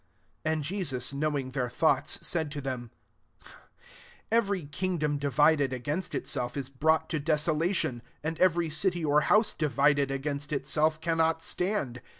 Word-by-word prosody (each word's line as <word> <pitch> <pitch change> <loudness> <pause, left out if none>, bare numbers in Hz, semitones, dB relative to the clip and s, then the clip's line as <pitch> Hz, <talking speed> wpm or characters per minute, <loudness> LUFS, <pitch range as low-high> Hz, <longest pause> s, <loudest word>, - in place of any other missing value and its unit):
"* - - -42
35 155 - +2
And 155 -1 -2
Jesus 140 -7 -2
knowing 140 -2 -1
their 125 -2 -2
thoughts, - - +1
said 160 -3 0
to 145 - -4
them, 130 -4 -4 0.7
" - - -25 0.7
Every 200 -7 +1
kingdom 150 -1 -1
divided 145 -1 +3
against 150 +8 -3
itself 125 -2 -2
is 135 -2 -4
brought 160 +4 +2
to 155 - 0
desolation; 155 -2 0 0.2
and 160 +1 -3
every 170 -3 +3
city 175 +1 0
or 150 0 +4
house 210 +9 +3
divided 145 -2 +2
against 140 +2 -3
itself 155 +2 +1
cannot 165 -1 +1
stand. 180 - -1
150 Hz, 150 wpm, -29 LUFS, 140-165 Hz, 0.7 s, or